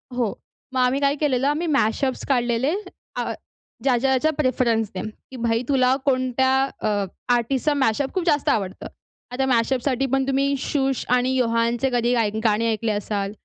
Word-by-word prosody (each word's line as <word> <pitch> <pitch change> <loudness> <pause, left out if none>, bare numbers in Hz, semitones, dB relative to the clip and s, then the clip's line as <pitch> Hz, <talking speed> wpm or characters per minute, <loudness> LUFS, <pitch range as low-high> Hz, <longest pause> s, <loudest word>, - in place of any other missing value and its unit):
हो. 235 -5 0 0.4
मग 260 - 0
आम्ही 255 +2 +2
काय 280 +1 +2
केलेलं 275 -3 +1
आम्ही 310 +4 0
मॅशअप्स 265 -1 0
काढलेले 245 +2 +1 0.4
अ, - - -2 0.5
ज्याच्या-ज्याच्या 265 +3 +2
प्रेफरन्सने. 230 -7 0 0.3
की - - -9
भाई 230 0 +1
तुला 260 -1 +3
कोणत्या 260 -1 +2 0.4
अ, 205 -1 0 0.3
आर्टिस्टचा 260 +5 +1
मॅशअप 265 0 0
खूप 370 - -1
जास्त 295 -4 +2
आवडतं. 195 -3 -1 0.4
आता 265 +2 0
मॅशअपसाठी 255 +2 +1
पण 270 0 +2
तुम्ही 275 +1 +1
शुष 270 -3 -1
आणि 250 +1 +1
योहानचे 235 +1 +1
कधी 240 0 +2 0.3
गाणे 225 +1 +2
ऐकले 220 +1 -1
असाल 205 -1 -2
255 Hz, 145 wpm, -23 LUFS, 230-270 Hz, 0.5 s, तुला